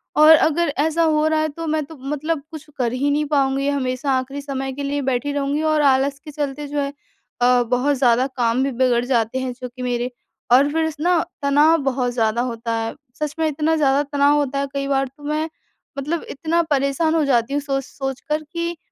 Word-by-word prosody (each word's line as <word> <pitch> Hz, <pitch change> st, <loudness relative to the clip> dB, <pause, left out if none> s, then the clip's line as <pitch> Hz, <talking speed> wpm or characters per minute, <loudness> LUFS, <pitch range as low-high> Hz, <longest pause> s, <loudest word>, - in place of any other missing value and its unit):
और 305 Hz, +1 st, +7 dB
अगर 320 Hz, +1 st, +2 dB
ऐसा 320 Hz, +2 st, +2 dB
हो 310 Hz, -1 st, +2 dB
रहा 315 Hz, 0 st, +2 dB
है 310 Hz, -, 0 dB
तो 330 Hz, +3 st, -7 dB
मैं 310 Hz, 0 st, 0 dB
तो 320 Hz, -, -12 dB
मतलब 295 Hz, +3 st, -3 dB
कुछ 310 Hz, -2 st, -9 dB
कर 245 Hz, -3 st, 0 dB
ही 275 Hz, +3 st, 0 dB
नहीं 295 Hz, +1 st, +1 dB
पाऊँगी। 275 Hz, -1 st, +1 dB
हमेशा 270 Hz, 0 st, -1 dB
आख़िरी 270 Hz, +2 st, -4 dB
समय 270 Hz, -1 st, -4 dB
के 285 Hz, +2 st, -5 dB
लिए 285 Hz, +1 st, -1 dB
बैठी 265 Hz, +1 st, -1 dB
रहूँगी 285 Hz, +1 st, -1 dB
और 310 Hz, -1 st, +2 dB
आलस्य 275 Hz, 0 st, +2 dB
के 300 Hz, -, -8 dB
चलते 290 Hz, 0 st, -4 dB
जो 290 Hz, +1 st, -2 dB
है 280 Hz, 0 st, -2 dB, 0.5 s
अ, 245 Hz, 0 st, +4 dB
बहुत 250 Hz, +4 st, +1 dB
ज़्यादा 250 Hz, 0 st, +3 dB
काम 240 Hz, +2 st, +2 dB
भी 275 Hz, -, 0 dB
बिगड़ 240 Hz, -2 st, +3 dB
जाते 245 Hz, -1 st, 0 dB
हैं 260 Hz, -1 st, -3 dB
जो 250 Hz, -, -5 dB
कि 255 Hz, -, -8 dB
मेरे 245 Hz, 0 st, -1 dB, 0.4 s
और 275 Hz, +4 st, +5 dB
फिर 320 Hz, 0 st, +1 dB
स 310 Hz, -, -9 dB
ना 355 Hz, +2 st, +3 dB, 0.2 s
तनाव 295 Hz, +3 st, +4 dB
बहुत 255 Hz, -2 st, 0 dB
ज़्यादा 230 Hz, -1 st, +1 dB
होता 230 Hz, -2 st, -3 dB
है। 225 Hz, 0 st, -3 dB, 0.3 s
सच 300 Hz, -1 st, -2 dB
में 320 Hz, -, +2 dB
इतना 310 Hz, +2 st, 0 dB
ज़्यादा 280 Hz, -2 st, +3 dB
तनाव 285 Hz, 0 st, +2 dB
होता 280 Hz, -1 st, 0 dB
है 280 Hz, -, -1 dB
कई 275 Hz, 0 st, -2 dB
बार 270 Hz, -1 st, +1 dB
तो 290 Hz, -, -16 dB
मैं 305 Hz, +2 st, -1 dB, 0.5 s
मतलब 300 Hz, +5 st, -2 dB
इतना 325 Hz, +4 st, 0 dB
परेशान 280 Hz, +3 st, +1 dB
हो 320 Hz, -, +3 dB
जाती 250 Hz, -1 st, +1 dB
हूँ, 290 Hz, -, 0 dB
सोच-सोच 270 Hz, -1 st, -4 dB
कर 305 Hz, +1 st, 0 dB
कि 340 Hz, 0 st, -3 dB
280 Hz, 215 wpm, -21 LUFS, 260-300 Hz, 0.5 s, और